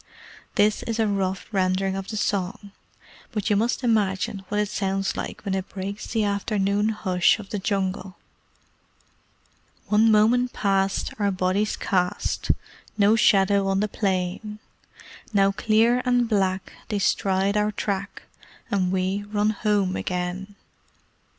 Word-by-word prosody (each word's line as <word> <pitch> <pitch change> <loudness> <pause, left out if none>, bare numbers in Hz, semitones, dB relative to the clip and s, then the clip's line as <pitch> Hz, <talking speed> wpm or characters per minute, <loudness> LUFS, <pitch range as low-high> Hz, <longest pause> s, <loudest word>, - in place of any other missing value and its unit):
This 210 +1 +3
is 230 -1 -3
a 225 - +2
rough 190 -2 -1
rendering 190 -1 +1
of 195 0 -5
the 215 - -4
song, 200 0 -2 0.6
but 210 0 -2
you - - +4
must 235 +5 0
imagine 200 -4 0
what 210 - 0
it 210 - +1
sounds 195 -1 -1
like - - -6
when 195 - -1
it 190 0 -3
breaks 200 +2 -6
the 225 -2 0
afternoon 200 0 0
hush 185 -4 +2
of 210 -3 -11
the 205 - -2
Jungle: 190 -1 -2 1.7
One 215 +2 +4
moment 235 +4 +3
past 195 -1 0
our 205 -1 +2
bodies 190 +2 0
cast 180 -2 -1 0.5
No 210 +1 +5
shadow 200 -2 +4
on 195 0 +1
the 210 - +1
plain; 195 +1 -2 0.8
Now 195 -1 +4
clear 220 +4 +2
and 245 -1 +2
black 190 -3 0
they 210 - -2
stride 195 0 +1
our 210 0 +2
track, 200 -1 -4 0.5
And 185 -3 +1
we 190 +2 0
run 210 0 +2
home 205 -3 0
again. 180 +2 -4
200 Hz, 135 wpm, -24 LUFS, 190-210 Hz, 1.7 s, No